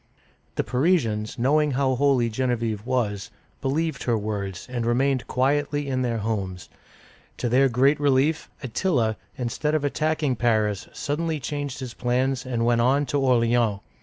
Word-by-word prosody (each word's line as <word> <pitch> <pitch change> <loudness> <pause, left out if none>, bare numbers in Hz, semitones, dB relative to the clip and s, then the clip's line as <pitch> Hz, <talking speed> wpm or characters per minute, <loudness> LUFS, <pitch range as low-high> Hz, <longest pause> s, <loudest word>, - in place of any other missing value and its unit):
The - - 0
Parisians, 125 -7 0
knowing 145 +4 +2
how 130 0 +1
holy 130 -2 +3
Genevieve 115 -2 -2
was, 105 -7 -1 0.3
believed 155 +1 -1
her 120 -2 +2
words, 100 -3 -4
and 125 -2 -3
remained 130 +2 +1
quietly 145 +2 0
in 130 -1 -1
their 120 -2 0
homes. 100 -5 -3 0.7
To 125 - -1
their 130 +3 +4
great 135 +5 +3
relief, 145 +2 +2
Attila, 120 - 0 0.2
instead 140 +5 -1
of 155 - 0
attacking 150 -2 0
Paris, 110 -4 +1
suddenly 155 +1 -2
changed 145 0 -4
his 125 -2 -6
plans 130 +1 0
and 115 -2 0
went 120 0 +3
on 135 +4 +3
to 140 +2 -1
Or'leans. 120 -5 +2
125 Hz, 145 wpm, -24 LUFS, 115-140 Hz, 0.7 s, their